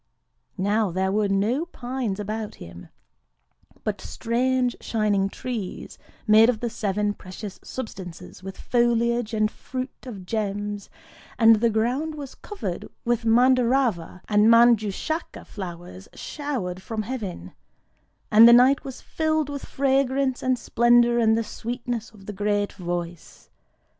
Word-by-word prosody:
Now 205 +2 +1
there 190 +2 -1
were 210 +1 +1
no 210 +10 +1
pines 245 - -4
about 215 +1 -4
him, 85 +1 -11 0.9
but - - -3
strange 250 +1 0
shining 205 -3 0
trees 220 -4 -6 0.3
made 220 +1 +6
of 235 -3 0
the 235 0 -3
Seven 205 0 -1
Precious 190 +1 -9
Substances, 180 -8 -8
with 195 0 -8
foliage 235 -1 +1
and 215 0 +1
fruit 255 0 -6 0.2
of 200 -7 -8
gems;—and 205 +2 0
the 235 +2 +2
ground 250 +8 -1
was 280 -3 -8
covered 415 -1 -6 0.2
with 235 -1 0
Mandârava 245 -6 +2
and 210 0 +4
Manjûshaka 230 - +2
flowers 175 - -8
showered 240 -12 -4
from 220 +1 -4
heaven;—and 210 - 0
the - - +8
night 255 +3 +5
was 265 -2 -8
filled 315 -2 -1
with 285 -1 -6
fragrance 270 -1 +1
and 255 -1 +1
splendour 240 0 +3
and 220 -1 +3
the 230 - 0
sweetness 235 0 -5
of 205 -3 -17
the 210 - -6
great 205 0 -1
Voice. 175 -2 -6
225 Hz, 125 wpm, -24 LUFS, 200-250 Hz, 0.9 s, the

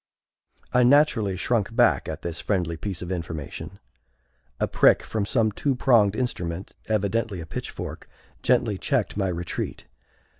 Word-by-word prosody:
I 125 - +5
naturally 125 -7 +4
shrunk 115 +2 0
back 120 -1 +3
at - - -6
this 85 -1 -3
friendly 90 -5 0
piece 95 +1 -4
of 90 - -6
information. 85 +1 -5 0.8
A - - +1
prick - - +4
from 105 -2 -2
some 110 -2 +2
two 135 +6 0
pronged 115 -6 +4
instrument, 95 -7 -3
evidently 110 -1 0
a 85 - -6
pitchfork, 80 - -6 0.3
gently - - +2
checked - - 0
my 100 -1 0
retreat. 85 -1 -4
100 Hz, 140 wpm, -25 LUFS, 90-115 Hz, 0.8 s, I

